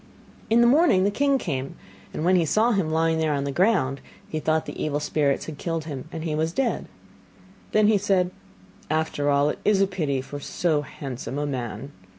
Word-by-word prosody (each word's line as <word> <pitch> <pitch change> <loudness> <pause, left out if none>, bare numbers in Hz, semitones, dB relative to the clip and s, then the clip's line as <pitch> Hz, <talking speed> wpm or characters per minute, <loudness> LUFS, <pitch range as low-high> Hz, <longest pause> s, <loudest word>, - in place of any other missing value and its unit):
In 230 +1 +5
the - - +6
morning 270 - +5
the 200 - +2
king 280 +4 +2
came, 135 - -4 0.4
and 155 - -3
when 185 +1 +4
he 175 - +4
saw 215 +9 +2
him 195 -7 +1
lying 160 0 +1
there 155 -2 +1
on 140 - -1
the 140 - -2
ground, 155 -6 +1 0.3
he 155 - -3
thought 155 0 0
the - - -5
evil 145 -1 -1
spirits 150 -2 0
had 150 -3 -8
killed 165 -2 -2
him 145 -1 -7
and 160 -2 -5
he 160 -2 -2
was 160 +2 -1
dead. 265 +1 -1 0.8
Then 215 0 +4
said 185 -2 +1
he: - - -27 0.6
'After 155 -2 0
all 140 +1 +3
it - - -4
is 210 -2 +3
a 195 - +5
pity, 150 -8 -2
for 145 +2 -7
so 155 +1 0
handsome 135 -2 -6
a 145 - -1
man. 125 -1 -4
160 Hz, 205 wpm, -25 LUFS, 145-190 Hz, 0.8 s, the